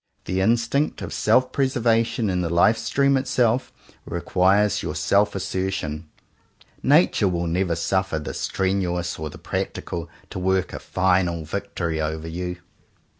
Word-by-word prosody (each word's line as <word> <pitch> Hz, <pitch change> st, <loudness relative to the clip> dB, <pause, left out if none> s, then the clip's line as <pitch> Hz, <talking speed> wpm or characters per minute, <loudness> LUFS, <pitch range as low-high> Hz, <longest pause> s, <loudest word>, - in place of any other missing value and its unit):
The 95 Hz, +1 st, -1 dB
instinct 115 Hz, +7 st, +1 dB
of -, -, -5 dB
self 130 Hz, 0 st, +3 dB
preservation 120 Hz, -4 st, +1 dB
in 90 Hz, -1 st, 0 dB
the 85 Hz, -, -1 dB
Life 85 Hz, +6 st, +4 dB
Stream 140 Hz, 0 st, +2 dB
itself, 125 Hz, -2 st, +1 dB, 0.3 s
re 85 Hz, -, -3 dB
quires 100 Hz, +4 st, +3 dB
your 75 Hz, -, -4 dB
self 100 Hz, +7 st, +2 dB
assertion. 95 Hz, -5 st, -3 dB, 0.7 s
Nature 145 Hz, -, +4 dB
will 85 Hz, -1 st, -1 dB
never 85 Hz, +1 st, 0 dB
suffer 95 Hz, 0 st, 0 dB
the 75 Hz, -, -5 dB
strenuous 90 Hz, -3 st, -1 dB
or 80 Hz, 0 st, -4 dB
the 85 Hz, -, -11 dB
practical 85 Hz, 0 st, -4 dB, 0.2 s
to -, -, -4 dB
work 95 Hz, 0 st, 0 dB
a -, -, -5 dB
final 90 Hz, -3 st, +1 dB
victory 85 Hz, -3 st, -3 dB
over 80 Hz, +1 st, -3 dB
you. 90 Hz, +2 st, -4 dB
95 Hz, 140 wpm, -23 LUFS, 85-105 Hz, 0.7 s, Life